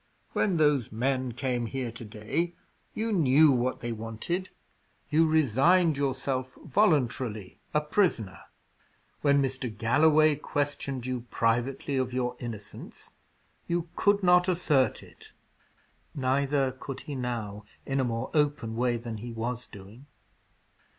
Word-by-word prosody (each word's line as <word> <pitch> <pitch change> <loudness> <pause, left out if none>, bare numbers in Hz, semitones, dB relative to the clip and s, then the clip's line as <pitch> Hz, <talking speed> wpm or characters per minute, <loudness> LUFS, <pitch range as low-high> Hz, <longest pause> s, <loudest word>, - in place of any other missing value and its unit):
When 190 -5 +1
those 150 -6 +2
men 130 +2 -1
came 125 -1 -2
here 130 -1 -3
to 115 +1 -9
day, 115 +12 -3 0.4
you 225 +1 -1
knew 155 -3 +5
what 125 0 0
they 120 - -3
wanted; 115 - -4 0.6
you 160 +2 +4
resigned 155 - +4
yourself, 135 -2 -2
voluntarily, 130 - +1
a 150 - +2
prisoner. 150 - 0 0.8
When 140 -1 +4
Mr. 130 -1 -2
Galloway 150 +7 +4
questioned 140 -3 -3
you 125 -2 -4
privately 120 +4 0
of 130 -1 -1
your 125 -1 -1
innocence, 110 -4 -8 0.6
you 170 0 -1
could 205 -1 +2
not 180 0 +5
assert 155 -7 +2
it." - - -15 0.8
Neither 135 0 +1
could 130 +1 -7
he 150 - -7
now 115 -5 -4 0.2
in 135 0 -1
a - - +3
more 115 -2 -2
open 145 -7 +1
way 120 0 +1
than 115 -1 -6
he 120 +3 -7
was 115 +2 -4
doing. 105 +8 -13
130 Hz, 130 wpm, -28 LUFS, 120-150 Hz, 0.8 s, knew